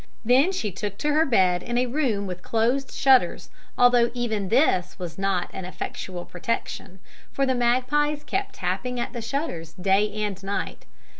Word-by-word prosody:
"Then 260 +10 +5
she 225 - -2
took 200 +2 -5
to 300 - -1
her 310 +2 +3
bed 185 -7 +3
in 240 0 -2
a 250 - +3
room 245 -6 0
with 180 -1 -6
closed 235 +7 0
shutters, 265 -1 +3 0.3
although 245 -1 +5
even 220 -5 -2
this 185 - +2
was 175 -1 -7
not 195 -2 0
an 190 - -5
effectual 180 0 -6
protection, 185 0 -4 0.3
for 275 - +1
the 260 - +1
magpies 260 +5 +1
kept 390 +6 -3
tapping 195 +7 -2
at 240 - -3
the 240 - -4
shutters 225 - -4
day 195 +3 +2
and 210 -2 -3
night." 200 +1 -4
230 Hz, 165 wpm, -25 LUFS, 190-260 Hz, 0.3 s, Then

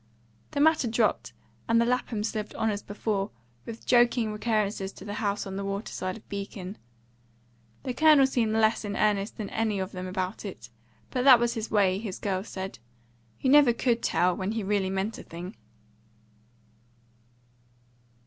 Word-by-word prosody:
The - - -3
matter 305 -3 +4
dropped, 220 - +1 0.4
and 230 0 +4
the 235 - +3
Laphams 235 -3 -1
lived 215 -1 -4
on 220 - +1
as 205 0 -3
before, 205 -1 -2 0.4
with 230 0 -8
joking 240 -2 +3
recurrences 210 -3 -1
to 190 - -12
the 205 - -5
house 205 -1 -1
on 195 0 -5
the 200 - -3
water 200 +2 -4
side 185 +1 -3
of 220 - -18
Beacon. 200 -1 -6 1.0
The 255 - -3
Colonel 305 -1 +6
seemed 235 -5 +1
less 220 0 +3
in 205 -1 -4
earnest 205 -1 +1
than 210 -2 -5
any 220 -2 0
of 190 0 -3
them 185 0 -6
about 185 +1 -3
it; 120 - -8 0.4
but 250 - 0
that 260 -4 +9
was 235 0 +1
his 225 -2 -4
way, 195 -3 +3
his 205 -4 -5
girls 195 0 -3
said; 190 -8 -6 0.6
you 260 - +2
never 285 -4 +7
could 235 0 +1
tell 180 0 +2
when 190 +3 -2
he 225 -2 -2
really 195 -1 0
meant 195 +3 -2
a - - -9
thing. 170 -1 -8
210 Hz, 170 wpm, -27 LUFS, 195-230 Hz, 1.0 s, that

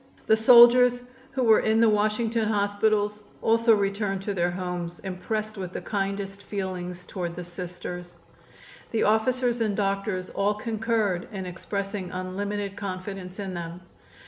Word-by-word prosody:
The 220 - +5
soldiers 245 +2 +7 0.3
who 260 -2 0
were 225 -2 +6
in 220 +1 +2
the 230 - +6
Washington 215 +1 +1
hospitals 210 0 +1 0.2
also 230 0 +4
returned 195 -1 -1
to 205 - -2
their 175 -2 +1
homes 175 -1 -4
impressed 210 +3 -4
with 185 -1 -5
the - - -4
kindest 195 -1 -3
feelings 180 -3 -5
toward 175 -2 -4
the 180 - -5
Sisters. 175 0 -7 0.7
The 225 - 0
officers 240 +2 +2
and 210 -3 0
doctors 195 -2 -1
all 205 +1 +1
concurred 215 -4 -1
in 190 -3 -5
expressing 195 +1 -4
unlimited 200 +2 -3
confidence 190 -1 -6
in 195 -2 -4
them. 170 0 -6
200 Hz, 140 wpm, -26 LUFS, 185-220 Hz, 0.7 s, soldiers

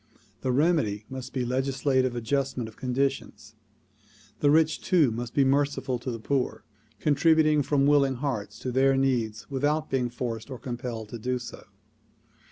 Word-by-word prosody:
The 130 - 0
remedy 125 -8 +1
must 130 -1 -6
be 130 -2 -2
legis 130 +1 -2
lative 130 -3 +2
readjustment 125 0 -1
of 110 - -12
conditions. 130 -4 -2 0.9
The 145 - +3
rich 155 +1 +3
too 160 -9 +3
must 120 +1 -5
be 140 - +4
merciful 135 -2 +1
to 125 - -5
the 115 - -3
poor, 130 +3 -2 0.4
contributing 155 +1 +3
from 140 0 +2
willing 140 -2 +4
hearts 125 -6 -3
to 130 - -3
their 135 +1 +3
needs 120 -4 -1
without 150 +3 0
being 125 -2 0
forced 120 -1 -5
or 130 - -6
compelled 120 -4 -5
to 120 - -7
do 125 +3 -1
so. 125 - -9
130 Hz, 160 wpm, -27 LUFS, 120-140 Hz, 0.9 s, be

